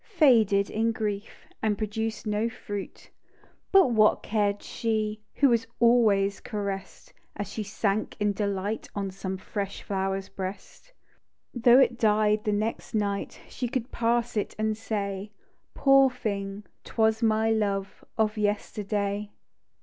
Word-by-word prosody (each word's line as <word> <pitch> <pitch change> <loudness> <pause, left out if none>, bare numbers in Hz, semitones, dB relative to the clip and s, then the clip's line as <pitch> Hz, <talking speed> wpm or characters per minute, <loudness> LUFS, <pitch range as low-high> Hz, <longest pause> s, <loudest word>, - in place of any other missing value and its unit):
Faded 220 - +5
in 225 +2 +1
grief. 210 -2 -4
And 215 -2 +1
produced 220 +1 -3
no 210 +2 0
fruit. 205 -4 -7 0.6
But 385 -10 +6
what 215 -2 +4
cared 205 -2 0
she? 215 -1 -2
Who 280 - +4
was 230 -1 +2
always 215 -5 +4
caress'd, 200 -3 -5 0.2
As 205 - -4
she 220 - -4
sank 205 0 -1
in 205 -1 +1
delight 200 +1 -2
On 200 -1 -2
some 190 0 -5
fresh 200 +1 -5
dower's 195 0 -1
breast. 195 - -8 0.6
Though 240 0 +6
it 245 -3 +4
died 210 -1 +3
the 210 - +2
next 215 +2 -2
night. 200 -2 -2
She 250 - -4
could 250 +1 -3
pass 235 0 0
it, 210 - -2
and 215 0 0
say, 205 -2 -3 0.2
" - - -45
Poor 275 -1 +6
thing 205 -5 -4
— - - -47
'twas 220 0 +1
my 220 0 +2
love 200 -3 -1
Of 215 -1 +1
yesterday." 205 0 -1
210 Hz, 140 wpm, -27 LUFS, 200-225 Hz, 0.6 s, But